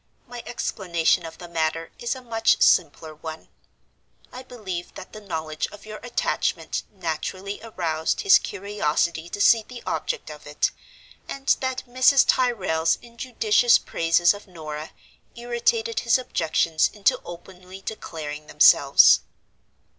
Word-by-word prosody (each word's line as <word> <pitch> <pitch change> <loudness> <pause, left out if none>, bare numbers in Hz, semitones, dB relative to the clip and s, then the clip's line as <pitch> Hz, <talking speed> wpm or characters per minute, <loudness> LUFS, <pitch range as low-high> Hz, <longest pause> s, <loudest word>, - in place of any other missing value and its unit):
My 245 -1 -8
explanation 175 -7 0
of 160 - -11
the 175 - -10
matter 165 -1 -2
is 240 +2 -2
a 260 - -11
much 225 -2 +1
simpler 160 -2 +2
one. 160 +1 -9 0.8
I 255 - -7
believe 205 -9 -7
that - - -11
the 215 - -9
knowledge 160 -5 -4
of 205 0 -14
your 215 0 -8
attachment 245 -1 -2
naturally 185 +2 -5
aroused 165 -8 -2
his 410 +1 +6
curiosity 170 -4 -2
to 205 - -6
see 225 +2 +5
the 245 +2 -11
object - - -3
of - - -12
it, - - 0 0.6
and 275 0 +1
that 260 -1 -3
Mrs. 255 +2 +4
Tyrrel's 190 -10 +1
injudicious 235 -1 +2
praises 165 +2 +2
of 205 +1 -12
Norah 155 -3 -7 0.5
irritated 245 - -1
his 235 +1 +3
objections 165 -9 0
into 205 -1 +1
openly 185 +2 -11
declaring 155 -8 -7
themselves. 60 0 +6
195 Hz, 130 wpm, -24 LUFS, 165-235 Hz, 0.8 s, his